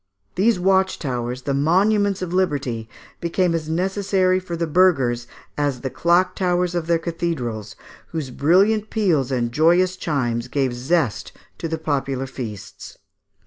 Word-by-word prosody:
These 210 Hz, +2 st, +2 dB
watch 190 Hz, +1 st, +2 dB
towers, 125 Hz, -2 st, -4 dB
the 140 Hz, -, -1 dB
monuments 195 Hz, +7 st, +2 dB
of 180 Hz, -1 st, -4 dB
liberty, 140 Hz, -11 st, -1 dB, 0.3 s
became 170 Hz, +1 st, 0 dB
as 160 Hz, -2 st, -3 dB
necessary 185 Hz, +1 st, +1 dB
for 180 Hz, -2 st, -6 dB
the 170 Hz, -, 0 dB
burghers 135 Hz, -9 st, +2 dB, 0.3 s
as 140 Hz, -4 st, -1 dB
the 130 Hz, -, -4 dB
clock 175 Hz, +2 st, +2 dB
towers 180 Hz, -1 st, 0 dB
of 170 Hz, -2 st, -2 dB
their 170 Hz, 0 st, +3 dB
cathedrals, 160 Hz, -, -4 dB, 0.3 s
whose 155 Hz, -6 st, -5 dB
brilliant 200 Hz, -, +3 dB
peals 165 Hz, -, +1 dB
and 120 Hz, -2 st, 0 dB
joyous 175 Hz, +6 st, +3 dB
chimes 120 Hz, -9 st, -2 dB
gave 135 Hz, -3 st, 0 dB
zest 130 Hz, -, -1 dB, 0.3 s
to -, -, -3 dB
the 160 Hz, 0 st, -2 dB
popular 135 Hz, -4 st, -2 dB
feasts 120 Hz, -6 st, -8 dB
(Fig. -, -, -28 dB
165 Hz, 145 wpm, -22 LUFS, 130-185 Hz, 0.3 s, their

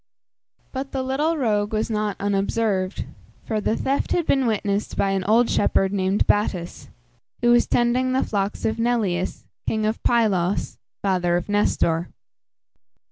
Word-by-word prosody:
But 270 Hz, +1 st, -5 dB
the 265 Hz, -1 st, -1 dB
little 295 Hz, +5 st, 0 dB
rogue 210 Hz, -5 st, 0 dB
was 215 Hz, 0 st, 0 dB
not 210 Hz, -1 st, -1 dB
unobserved, 200 Hz, -1 st, 0 dB, 0.4 s
for 215 Hz, -2 st, -1 dB
the 220 Hz, -, 0 dB
theft 275 Hz, +1 st, -1 dB
had 345 Hz, -, +1 dB
been 270 Hz, -4 st, +2 dB
witnessed 205 Hz, -1 st, -1 dB
by 195 Hz, -, +2 dB
an 195 Hz, -1 st, 0 dB
old 230 Hz, +3 st, +4 dB
shepherd 195 Hz, -1 st, +1 dB
named 195 Hz, 0 st, +1 dB
Battus, 185 Hz, -4 st, -1 dB, 0.5 s
who 240 Hz, -, +5 dB
was 240 Hz, 0 st, +4 dB
tending 245 Hz, +2 st, +2 dB
the 260 Hz, -, +2 dB
flocks 200 Hz, -1 st, -2 dB
of 220 Hz, -, -1 dB
Neleus, 215 Hz, -7 st, -1 dB, 0.2 s
king 220 Hz, -1 st, 0 dB
of 215 Hz, +1 st, -1 dB
Pylos 205 Hz, -6 st, +1 dB, 0.2 s
(father 180 Hz, -3 st, +1 dB
of 175 Hz, -, -4 dB
Nestor). 175 Hz, -5 st, +1 dB
210 Hz, 145 wpm, -23 LUFS, 195-240 Hz, 0.5 s, who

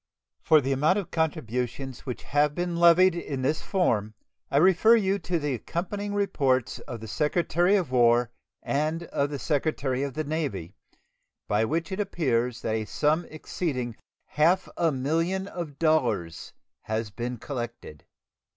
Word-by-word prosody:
For 155 Hz, -1 st, +5 dB
the 135 Hz, 0 st, -2 dB
amount 150 Hz, +8 st, +3 dB
of 190 Hz, -4 st, -4 dB
contributions 135 Hz, -4 st, -3 dB
which 125 Hz, -, -5 dB
have 145 Hz, +1 st, +1 dB
been 175 Hz, -1 st, -2 dB
levied 170 Hz, +2 st, +6 dB
in 140 Hz, -6 st, -4 dB
this 150 Hz, +4 st, 0 dB
form 110 Hz, -, 0 dB, 0.3 s
I -, -, +1 dB
refer 190 Hz, +7 st, +6 dB
you 200 Hz, -3 st, +1 dB
to 175 Hz, 0 st, -1 dB
the 145 Hz, -3 st, -1 dB
accompanying 200 Hz, -, -4 dB
reports 140 Hz, -, +1 dB
of 115 Hz, -2 st, -8 dB
the 110 Hz, -, -7 dB
Secretary 175 Hz, -, +1 dB
of 180 Hz, -9 st, 0 dB
War 120 Hz, -1 st, +4 dB, 0.3 s
and 155 Hz, +4 st, -1 dB
of 140 Hz, -3 st, -1 dB
the 145 Hz, -, -4 dB
Secretary 140 Hz, -3 st, -1 dB
of 140 Hz, -2 st, -3 dB
the 155 Hz, -, -1 dB
Navy, 140 Hz, -, -3 dB, 0.7 s
by 105 Hz, +2 st, +2 dB
which 160 Hz, +7 st, -2 dB
it 190 Hz, -, -3 dB
appears 125 Hz, -, -1 dB
that 110 Hz, -, -1 dB
a 110 Hz, -1 st, -1 dB
sum 155 Hz, +8 st, +1 dB
exceeding 135 Hz, -6 st, -4 dB, 0.3 s
half 165 Hz, +5 st, +2 dB
a 165 Hz, -2 st, +2 dB
million 165 Hz, +8 st, -1 dB
of 165 Hz, -7 st, -6 dB
dollars 125 Hz, -, 0 dB, 0.3 s
has 110 Hz, -1 st, -2 dB
been 120 Hz, +3 st, -4 dB
collected. 120 Hz, -, -7 dB
150 Hz, 150 wpm, -26 LUFS, 125-170 Hz, 0.7 s, levied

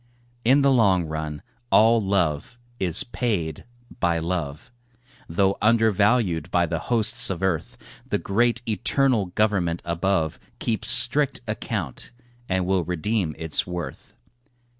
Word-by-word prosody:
In 135 Hz, +4 st, +4 dB
the 140 Hz, -, +4 dB
long 100 Hz, -8 st, +3 dB
run 80 Hz, -1 st, -5 dB, 0.3 s
all 115 Hz, 0 st, +5 dB
love 95 Hz, +1 st, -1 dB, 0.2 s
is 90 Hz, -3 st, +2 dB
paid 100 Hz, -, -3 dB, 0.3 s
by 85 Hz, -1 st, +1 dB
love, 80 Hz, -3 st, -4 dB, 0.6 s
Though 95 Hz, +3 st, +1 dB
undervalued 110 Hz, -5 st, +2 dB
by 85 Hz, -1 st, +2 dB
the 85 Hz, -1 st, -3 dB
hosts 115 Hz, -3 st, +2 dB
of 95 Hz, -1 st, -4 dB
earth; 90 Hz, -4 st, -2 dB, 0.3 s
The -, -, +1 dB
great 120 Hz, +4 st, 0 dB
eternal 115 Hz, +1 st, +1 dB
Government 90 Hz, -3 st, 0 dB
above 85 Hz, -1 st, -1 dB, 0.2 s
Keeps 110 Hz, -2 st, -1 dB
strict 125 Hz, +4 st, +4 dB
account 105 Hz, -, -5 dB, 0.4 s
and 95 Hz, -1 st, 0 dB
will 95 Hz, -1 st, +1 dB
redeem 90 Hz, 0 st, -2 dB
its 80 Hz, 0 st, -1 dB
worth. 85 Hz, -6 st, -7 dB
95 Hz, 120 wpm, -24 LUFS, 85-115 Hz, 0.6 s, all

